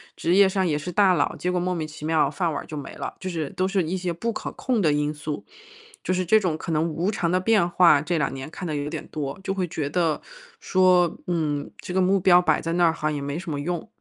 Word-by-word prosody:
职 170 +2 +1
业 200 -1 +7
上 190 0 0
也 155 -4 +1
是 155 +4 -5
大 195 0 +4
佬， - - 0
结 180 - -2
果 180 - 0
莫 180 +1 -1
名 160 -3 -3
其 155 0 -9
妙 160 -1 +2
饭 175 -3 -1
碗 145 - -3
儿 - - -11
就 155 - -8
没 140 - -7
了， - - -6
就 185 - -4
是 160 -5 -3
都 185 - -1
是 195 -1 +1
一 170 +4 -2
些 180 -1 -2
不 230 +8 -2
可 - - -5
控 250 -4 -1
的 155 - +3
因 150 0 0
素。 150 0 -6 0.6
就 - - -1
是 185 0 -1
这 220 +6 +5
种 175 -6 -1
可 165 - -5
能 155 0 +2
无 170 +6 -1
常 170 -4 -1
的 185 - +2
变 195 -2 +3
化， 170 -5 +5
这 170 +2 -1
两 150 - 0
年 135 +2 -6
看 180 +2 -6
得 155 - -2
有 145 0 -3
点 - - -6
多， 145 +1 -5
就 195 - -1
会 185 -2 -1
觉 155 -3 -3
得， 165 0 0 0.4
说： 185 -2 +3
“嗯， 150 -4 -1
这 180 - -7
个 190 - +2
目 190 +1 +3
标 180 -1 +6
摆 155 -4 +2
在 165 0 -3
那 175 0 +3
儿 165 - +4
好 165 - -10
像 155 - 0
也 145 - -3
没 140 +2 -3
什 175 -2 -6
么 145 - -3
用。” 175 +5 -3
170 Hz, 305 characters per minute, -24 LUFS, 155-185 Hz, 0.6 s, 业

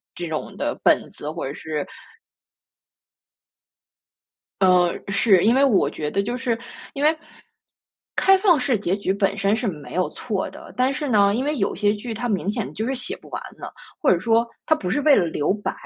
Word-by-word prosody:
这 175 -1 -5
种 155 -1 -5
的 - - -1
本 - - +3
子， 150 - -8
或 160 +2 -5
者 140 - -5
是 150 -1 -4 2.8
呃， 180 -2 +4 0.2
是， 195 -2 +4
因 230 - +5
为 270 +2 +4
我 240 -8 +3
觉 150 -1 -4
得 200 - 0
就 240 +4 -3
是 240 -3 -1 0.4
因 280 - -2
为 315 +1 +4 1.0
开 385 0 +5
放 375 -6 +4
式 255 -1 +1
结 190 -1 -1
局 200 -2 -1
本 200 0 0
身 200 +1 +2
是 240 +1 -2
没 155 -5 -7
有 185 0 +1
错 205 -6 -3
的， - - -12
但 255 +2 +2
是 285 +1 -3
呢， 200 -3 +4
因 255 +4 -1
为 300 +1 -1
有 200 -6 0
些 205 +1 +2
剧 225 +3 -6
它 235 +3 -3
明 200 -2 0
显 225 -1 -4
就 220 - -3
是 265 - -1
写 255 - -4
不 - - -17
完 - - -4 0.2
了， - - -8 0.3
或 290 - +4
者 180 - +2
说 230 +5 +2 0.2
他 315 - +4
不 185 -11 -4
是 290 - +1
为 300 -2 +6
了 175 - +3
留 155 +2 0
白， 205 - -3
210 Hz, 220 characters per minute, -22 LUFS, 185-255 Hz, 2.8 s, 为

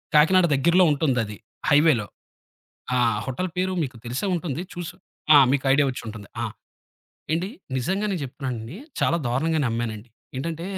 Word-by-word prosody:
కాకినాడ 175 +5 +6
దగ్గరలో 170 +7 +4
ఉంటుందది, 125 -8 0 0.3
హైవేలో. 145 -7 +4 0.9
ఆ! - - +3 0.3
హోటలు 135 +8 -2
పేరు 185 +1 0
మీకు 130 -4 -6
తెలిసే 125 - -2
ఉంటుంది. 165 -3 -3
చూసు 175 -2 -6 0.4
ఆ! - - +10
మీకు 140 0 0
ఐడియా 145 +1 +4
వచ్చుంటుంది. 110 -4 -8
ఆ! - - 0 0.9
ఏండి 170 +4 0 0.3
నిజంగానే 190 +9 -1
చెప్తున్నానండి 130 -1 -5 0.2
చాలా 170 - +3
దారుణంగా 155 +7 +1
నమ్మానండి. 115 -1 -3 0.3
ఏంటంటే 165 +4 -4
140 Hz, 130 wpm, -24 LUFS, 120-170 Hz, 0.9 s, ఆ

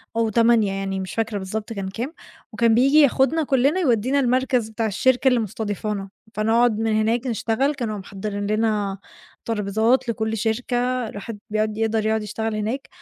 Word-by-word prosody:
أو 230 -1 +1
08:00 230 -2 +3
يعني 195 0 -3
مش 185 -3 -5
فاكرة 220 0 -1
بالضبط 210 +3 -4
كان 195 -3 -4
كام، 240 +10 -5 0.4
وكان 230 -2 +3
بييجي 275 +5 +5
ياخدنا 280 +3 +3
كلّنا 275 +5 +2
يودّينا 260 - +2
المركز 255 -3 +1
بتاع 225 +1 -2
الشركة 250 +5 +2
اللي 250 -2 +4
مُستضيفانه، 205 -1 -3 0.2
فنقعُد 225 +1 +2
من 225 -1 0
هناك 230 +4 0
نشتغل، 235 +4 0
كانوا 225 -5 -3
محضّرين 205 +1 -5
لنا 210 -2 0 0.5
ترابيزات 220 +3 +1
لكل 220 0 -1
شركة، 245 +3 -1
الواحد 205 +1 -7
بيقعُد 215 0 -1
يقدر 220 -1 0
يقعُد 220 0 +1
يشتغل 220 +1 -3
هناك، 220 +6 -3
225 Hz, 155 wpm, -22 LUFS, 210-245 Hz, 0.5 s, بييجي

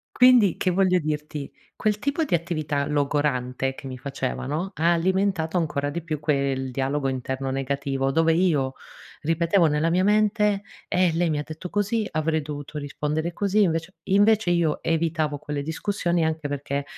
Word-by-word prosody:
Quindi, 250 -7 +6
che 185 - +1
voglio 185 0 +3
dirti: 150 -2 -4 0.2
quel 210 -1 0
tipo 280 +7 -1
di 225 - -1
attività 155 -4 -1
logorante 140 -3 0
che 135 - -10
mi 130 -1 -6
facevano, 140 +6 -3
ha 165 +2 +3
alimentato 185 -1 +1
ancora 150 -4 0
di 170 +2 -4
più 155 -3 -4
quel 140 -3 0
dialogo 135 +2 -1
interno 130 +1 -3
negativo, 135 0 -1
dove 165 +1 +3
io 150 -7 +1 0.5
ripetevo 165 +3 +3
nella 150 +2 +1
mia 185 +2 +2
mente: 210 -1 +2 0.2
"Eh, 180 -2 +2
lei 170 0 +1
mi 150 - 0
ha - - -1
detto 160 +3 -8
così, 205 +1 0
avrei 155 0 0
dovuto 145 0 -7
rispondere 150 +3 -2
così"; 205 +3 +2
invece 165 0 0
invece 205 0 +3
io 170 -3 +1
evitavo 160 -2 0
quelle 145 -1 -4
discussioni, 170 +1 -1
anche 160 -1 -2
perché 140 0 -3
160 Hz, 160 wpm, -24 LUFS, 145-180 Hz, 0.5 s, Quindi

